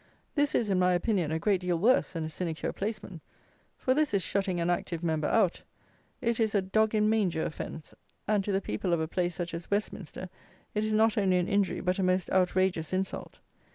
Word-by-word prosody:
This 290 Hz, 0 st, +1 dB
is, 215 Hz, -4 st, +1 dB
in 185 Hz, -, +2 dB
my 180 Hz, 0 st, +4 dB
opinion, 175 Hz, -3 st, +1 dB
a 160 Hz, -, +1 dB
great 190 Hz, +2 st, +1 dB
deal 180 Hz, -1 st, 0 dB
worse 235 Hz, +10 st, +3 dB
than 165 Hz, -2 st, -3 dB
a 155 Hz, -, -3 dB
sinecure 165 Hz, -1 st, -3 dB
placeman; 200 Hz, -5 st, -5 dB, 0.6 s
for 255 Hz, -, +1 dB
this 295 Hz, -5 st, +1 dB
is 195 Hz, -, +1 dB
shutting 195 Hz, -2 st, -1 dB
an 170 Hz, -, 0 dB
active 175 Hz, -1 st, -2 dB
Member 160 Hz, -2 st, 0 dB
out. 200 Hz, -6 st, +2 dB, 0.6 s
It 235 Hz, -1 st, 0 dB
is 220 Hz, -2 st, +1 dB
a 200 Hz, -, +4 dB
dog 220 Hz, +3 st, +2 dB
in 210 Hz, 0 st, +3 dB
manger 195 Hz, -7 st, +1 dB
offence; 155 Hz, 0 st, -6 dB, 0.3 s
and, 210 Hz, -2 st, +2 dB
to 205 Hz, -, -2 dB
the 195 Hz, 0 st, +1 dB
people 170 Hz, -, -2 dB
of 170 Hz, -, +2 dB
a 160 Hz, -, -1 dB
place 175 Hz, 0 st, -1 dB
such 175 Hz, -2 st, -4 dB
as 165 Hz, 0 st, -6 dB
Westminster, 200 Hz, -3 st, -3 dB, 0.5 s
it 210 Hz, -, 0 dB
is 215 Hz, -, -1 dB
not 220 Hz, 0 st, +3 dB
only 190 Hz, -2 st, +3 dB
an 180 Hz, 0 st, 0 dB
injury, 200 Hz, -1 st, +1 dB
but 180 Hz, +1 st, 0 dB
a -, -, +2 dB
most 185 Hz, 0 st, +1 dB
outrageous 185 Hz, -3 st, +1 dB
insult. 190 Hz, +1 st, -3 dB
185 Hz, 215 wpm, -29 LUFS, 175-210 Hz, 0.6 s, my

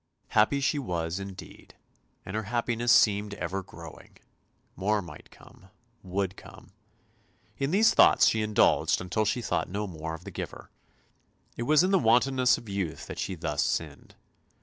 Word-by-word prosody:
Happy 110 Hz, +7 st, +3 dB
she 140 Hz, +2 st, 0 dB
was 85 Hz, -7 st, -3 dB
indeed, 100 Hz, -1 st, -11 dB, 0.5 s
and 95 Hz, -, -6 dB
her 110 Hz, -1 st, -2 dB
happiness 120 Hz, 0 st, 0 dB
seemed 105 Hz, -1 st, +3 dB
ever 95 Hz, -1 st, -4 dB
growing; 85 Hz, -4 st, -13 dB, 0.6 s
more 105 Hz, +3 st, 0 dB
might 85 Hz, -6 st, -11 dB
come, 95 Hz, -, -18 dB, 0.3 s
would 95 Hz, 0 st, -3 dB
come. -, -, -15 dB, 0.9 s
In 135 Hz, 0 st, 0 dB
these 205 Hz, +7 st, +4 dB
thoughts -, -, +6 dB
she 110 Hz, -, +2 dB
indulged, 105 Hz, 0 st, +2 dB
until 95 Hz, +4 st, -1 dB
she 120 Hz, +3 st, -1 dB
thought -, -, -1 dB
no 100 Hz, +3 st, -3 dB
more 80 Hz, -3 st, -6 dB
of 80 Hz, -, -13 dB
the -, -, -9 dB
Giver. -, -, -8 dB, 0.8 s
It 120 Hz, -, -4 dB
was 155 Hz, +2 st, +5 dB
in 185 Hz, -, +1 dB
the 195 Hz, -, +4 dB
wantonness 125 Hz, +1 st, +3 dB
of 115 Hz, -, -12 dB
youth 100 Hz, -5 st, -4 dB
that -, -, -8 dB
she -, -, -3 dB
thus -, -, -2 dB
sinned. -, -, -4 dB
105 Hz, 160 wpm, -27 LUFS, 95-120 Hz, 0.9 s, thoughts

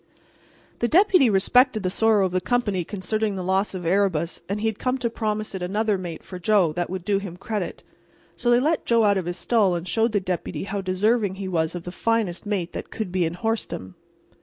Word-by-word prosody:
The 235 Hz, -, +1 dB
Deputy 365 Hz, -, +5 dB
respected 215 Hz, +3 st, +3 dB
the 185 Hz, -, 0 dB
sorrow 215 Hz, -1 st, +3 dB
of 185 Hz, -, -2 dB
the 185 Hz, 0 st, 0 dB
company 205 Hz, -5 st, 0 dB
concerning 210 Hz, +3 st, -2 dB
the 185 Hz, -, -4 dB
loss 190 Hz, +2 st, 0 dB
of 180 Hz, -2 st, -5 dB
Erebus, 180 Hz, -2 st, +1 dB
and 200 Hz, +1 st, -1 dB
he 220 Hz, -, -3 dB
had 220 Hz, -2 st, -1 dB
come 255 Hz, +1 st, 0 dB
to 240 Hz, -3 st, -2 dB
promise 215 Hz, -2 st, -2 dB
it 190 Hz, -, -5 dB
another 210 Hz, +4 st, 0 dB
mate 175 Hz, -4 st, -6 dB
for 180 Hz, -, -8 dB
Joe 180 Hz, -3 st, +3 dB
that 175 Hz, +1 st, -2 dB
would 185 Hz, -1 st, -5 dB
do 200 Hz, -1 st, +2 dB
him 190 Hz, -3 st, -7 dB
credit. 205 Hz, -1 st, -4 dB, 0.5 s
So 240 Hz, -, -1 dB
they 240 Hz, 0 st, +5 dB
let 310 Hz, +5 st, +1 dB
Joe 230 Hz, -1 st, +4 dB
out 200 Hz, -2 st, +3 dB
of 175 Hz, -, -5 dB
his 175 Hz, +1 st, -3 dB
stall 205 Hz, -6 st, +2 dB
and 170 Hz, +1 st, -4 dB
showed 225 Hz, +3 st, +1 dB
the 205 Hz, -, +3 dB
Deputy 180 Hz, -4 st, -3 dB
how 200 Hz, +1 st, -3 dB
deserving 195 Hz, +2 st, +1 dB
he 195 Hz, 0 st, -5 dB
was 165 Hz, -2 st, -1 dB
of 175 Hz, -, -5 dB
the 180 Hz, -, -6 dB
finest 215 Hz, -2 st, -1 dB
mate 190 Hz, -5 st, -2 dB
that -, -, -6 dB
could 215 Hz, -5 st, -4 dB
be 180 Hz, -1 st, +1 dB
in 165 Hz, +1 st, -3 dB
horsedom. 215 Hz, -, -3 dB
200 Hz, 225 wpm, -24 LUFS, 180-220 Hz, 0.5 s, Deputy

